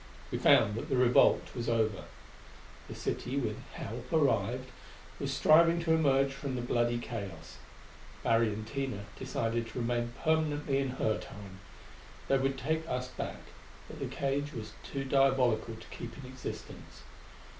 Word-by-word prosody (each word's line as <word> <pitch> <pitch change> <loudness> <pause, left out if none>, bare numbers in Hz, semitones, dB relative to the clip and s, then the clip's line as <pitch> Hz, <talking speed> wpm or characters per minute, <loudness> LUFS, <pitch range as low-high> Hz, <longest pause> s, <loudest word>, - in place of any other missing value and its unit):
We - - -1
found 105 - +6
that 115 +8 -4
the 135 - +2
revolt 125 -1 +5
was 120 -2 -3
over. 110 -4 +1 0.8
The - - -7
city, 130 +3 -3
with 110 -6 -1
help - - -7
arrived, - - +1 0.5
was - - -2
striving 165 +2 +5
to 165 -1 +2
emerge 135 -3 +3
from 135 -1 -4
the 120 - -2
bloody 120 -1 +1
chaos. 100 -9 -6 0.7
Larry 115 0 +4
and 110 0 -3
Tina 130 -5 -3
decided 115 0 -1
to 115 - -9
remain 120 0 -1
permanently 150 -3 +1
in 135 -1 0
her 110 - +1
Time. 100 -2 -10 0.7
They 135 - +4
would 135 0 0
take 160 +4 -1
us 125 0 -2
back; - - -5 0.5
but - - -10
the - - -2
cage 140 +1 -2
was 110 -2 -6
too 135 -1 -4
diabolical 130 -4 +2
to 110 - -12
keep 115 -1 -7
in 135 - -9
existence. 130 0 -8
125 Hz, 155 wpm, -31 LUFS, 115-140 Hz, 0.8 s, found